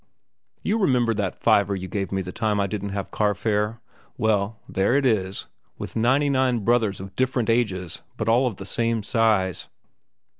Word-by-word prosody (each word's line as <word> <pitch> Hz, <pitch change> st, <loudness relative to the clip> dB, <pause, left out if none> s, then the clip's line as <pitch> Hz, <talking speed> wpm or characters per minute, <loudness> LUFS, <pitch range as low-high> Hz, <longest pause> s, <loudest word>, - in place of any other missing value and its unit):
"You 220 Hz, +2 st, +1 dB
remember 125 Hz, -, +2 dB
that 100 Hz, -4 st, -2 dB
fiver 100 Hz, -1 st, +4 dB
you 95 Hz, -1 st, -5 dB
gave 100 Hz, +1 st, -3 dB
me 95 Hz, -1 st, -1 dB
the 90 Hz, -, -6 dB
time 105 Hz, 0 st, 0 dB
I 100 Hz, -, +2 dB
didn't 100 Hz, 0 st, -4 dB
have 100 Hz, 0 st, -4 dB
carfare? 105 Hz, +2 st, 0 dB, 0.4 s
Well, 110 Hz, -1 st, +1 dB
there 95 Hz, +6 st, +1 dB
it 140 Hz, -1 st, +2 dB
is, 100 Hz, -6 st, 0 dB, 0.3 s
with -, -, -7 dB
ninety 130 Hz, +6 st, +3 dB
nine 130 Hz, -4 st, +2 dB
brothers 110 Hz, -2 st, +1 dB
of 95 Hz, +1 st, -9 dB
different 125 Hz, -3 st, +1 dB
ages 95 Hz, -7 st, -1 dB, 0.2 s
but 110 Hz, -, -3 dB
all 120 Hz, +3 st, +4 dB
of 115 Hz, -, -3 dB
the 95 Hz, -, -8 dB
same 115 Hz, +1 st, 0 dB
size." 105 Hz, -5 st, +1 dB
110 Hz, 175 wpm, -24 LUFS, 100-120 Hz, 0.4 s, fiver